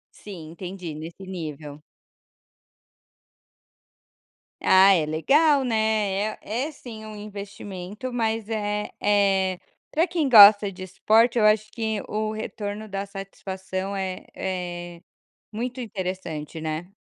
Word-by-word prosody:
Sim, 170 -6 -10
entendi. 180 -1 -7
Nesse 165 +5 -9
nível. 155 -5 -7 2.8
Ah, 190 +1 +7
é 165 -5 +2
legal, 275 - +3
né. 215 -3 +1
É - - -30 0.3
é 310 - -5
sim 225 -6 -10
um 215 0 -8
investimento, 205 +1 -7
mas 225 -2 -1
é 210 -1 -2
é, 195 -2 +2 0.3
pra 320 +3 +2
quem 335 -5 -1
gosta 205 -3 +9
de 185 -1 -9
esporte, 225 +6 +3
eu 215 - +4
acho 215 0 +3
que 220 -3 -2
o 215 0 -1
retorno 215 0 -5
da 195 0 -3
satisfação 195 0 -5
é 190 -1 -4
é 175 -2 -5 0.5
muito 245 +4 -4
interessante, 185 -8 -5
né. 160 +3 -4
200 Hz, 115 wpm, -25 LUFS, 185-220 Hz, 2.8 s, gosta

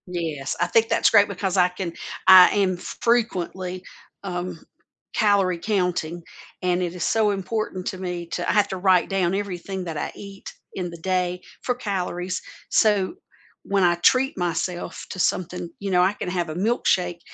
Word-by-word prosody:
Yes, 160 -6 -3
I 175 - +2
think 225 +5 +3
that's 230 - +4
great 205 -2 +6
because 195 -1 -2
I 180 -1 +6
can 180 -1 -5 0.3
I 185 -1 +10
am 190 -3 +1
fr 230 +5 -2
frequently, 185 -5 -1 0.4
um, 180 -1 -4 0.6
calorie 195 -5 +2
counting, 180 -4 -1 0.4
and 180 0 +1
it 175 0 -3
is 180 - -2
so 220 -2 +2
important 195 -1 -3
to 185 - -3
me 180 -2 -4
to - - -3
I - - +2
have 205 0 +4
to 190 - -3
write 185 -1 +3
down 190 -2 +1
everything 190 -1 -4
that 165 -3 -5
I - - -3
eat 200 -1 -10 0.2
in 180 -2 -4
the 170 - -9
day 180 +1 -1 0.2
for 250 - -1
calories, 185 -5 -3 0.3
so 210 - +2 0.5
when 200 -1 +1
I 175 -1 +5
treat 255 +10 +3
myself 175 0 -3
to 185 - -7
something 180 -1 -1
you 200 -1 -3
know, 180 -1 +4
I 185 +3 +3
can 180 - -5
have 175 -2 -2
a 155 - -5
milkshake 180 -4 +1
185 Hz, 175 wpm, -23 LUFS, 175-200 Hz, 0.6 s, I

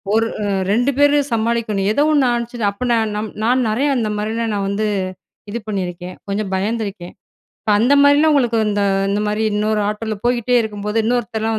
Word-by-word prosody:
ஒரு 225 0 +2 0.2
அ - - -1 0.3
2 245 +6 +2
பேரு 290 0 +4
சமாளிக்கனும். 225 -3 0
ஏதோ 285 +7 +2
ஒண்ணு 285 -3 +3
ஆனுச்சுனா 235 -2 -2
அப்படினா, 240 +3 0
நான் 220 -1 0
நம் 215 +1 -3
நான் 250 +2 +2
நிறைய 260 +7 +1
அந்த 225 -3 0
மாரிலாம் 220 +1 -2
நான் 200 -1 -1
வந்து, 210 +2 -1 0.6
இது 235 - -3
பண்ணியிருக்கேன். 180 -3 -4
கொஞ்சம் 200 0 -3
பயந்துருக்கேன். 200 -3 -3 0.7
அந்த 240 +6 +3
மாரிலாம் 290 +2 +5
உங்களுக்கு 240 -5 +2
இந்த 205 0 0 0.3
இந்த 205 +1 0
மாரி 210 +1 -1
இன்னொரு 210 0 0
ஆட்டோல 215 +1 -3
போய்கிட்டே 245 0 +2
இருக்கும்போது, 210 0 -3
இன்னொருத்தர்லாம் 225 -2 -1
220 Hz, 165 wpm, -19 LUFS, 210-240 Hz, 0.7 s, மாரிலாம்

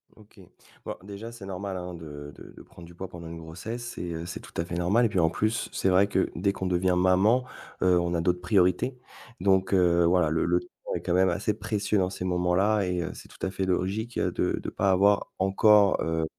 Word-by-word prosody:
OK. 110 -1 -19 0.5
Bah, - - -5
déjà 100 +3 -8
c'est 115 -4 -10
normal, 95 0 -5
hein, 90 0 -6
de 75 -3 -9
de - - -13
de - - -12
prendre 85 - -14
du 85 0 -15
poids 95 +2 -6
pendant 85 -2 -9
une 85 0 -7
grossesse 110 +9 -7
et 85 -1 -4
heu, 80 +1 -5
c'est 85 - -6
tout - - -14
à 85 - +1
fait 85 +1 -6
normal 95 +8 +2
et - - +2
puis 95 - 0
en 80 -1 +4
plus, 110 +6 -1
c'est 95 - +1
vrai 95 +2 +4
que 95 -2 0
dès 100 +3 0
qu'on 95 - -3
devient 90 0 +1
maman, 95 +7 +4 0.4
heu, 90 -1 +4
on 85 0 -1
a 85 - 0
d'autres 90 +1 +1
priorités 90 +7 +2 0.4
donc 95 0 +2
heu, 85 -2 +4
voilà 90 -2 +3
le 80 +1 0
le 90 +1 +2
temps - - -15 0.3
est - - -3
quand 90 - -1
même 95 +1 +4
assez 100 +5 0
précieux 105 0 -1
dans 90 -2 +1
ces 90 - -6
moments-là 90 +3 +2
et 90 -1 -1
heu, 85 - -4
c'est - - -12
tout - - -7
à 95 - -2
fait 95 - -2
logique, 100 +6 -1
heu, - - 0
de - - -1
de - - -4
pas 100 -1 +1
avoir 100 +2 +3
encore, 100 +1 +4
heu, 80 -1 0
95 Hz, 240 wpm, -27 LUFS, 85-100 Hz, 0.5 s, en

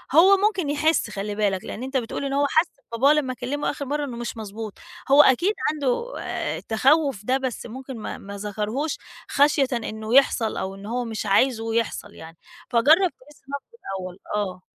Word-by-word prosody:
هو 385 +4 +8
ممكن 390 -6 +1
يحِس، 310 +3 +2
خلّي 205 +1 -4
بالك، 200 -3 0
لأن 230 - -6
أنت 265 +1 -1
بتقول 245 +3 -3
إن 275 - -2
هو 285 +1 +3
حس 320 +2 +3 0.2
بباباه 265 +6 +4
لمّا 285 -4 0
كلّمه 255 +4 -2
آخِر 280 0 -6
مرَّة 290 +2 -1
إنه 245 -4 -6
مش 235 -1 -5
مضبوط، 215 0 -6 0.4
هو 285 +2 +9
أكيد 345 - +4 0.2
عنده 295 - -1
آآ، - - -3
تخوُّف 270 +1 +2
ده 260 +3 +2
بس 260 -3 -4
ممكن 260 +2 -8
ما 215 - -5
ما 200 +1 -9
ذكرهوش 215 +9 -2 0.3
خَشيةً 285 -1 +3
إنه 220 0 -2
يحصل 240 -5 +4
أو 190 +1 -3
إن 195 +1 -11
هو 240 +3 -2
مش 220 -1 -4
عايزه 225 +2 +2
يحصَل 220 -2 -2
يعني، 165 +1 -12 0.3
فجرّب 310 +10 +5
تجِس 295 +3 -19
نبضه 280 0 -5 0.3
الأول، 185 0 -8 0.2
آه. 190 -3 -2
255 Hz, 185 wpm, -24 LUFS, 215-285 Hz, 0.4 s, هو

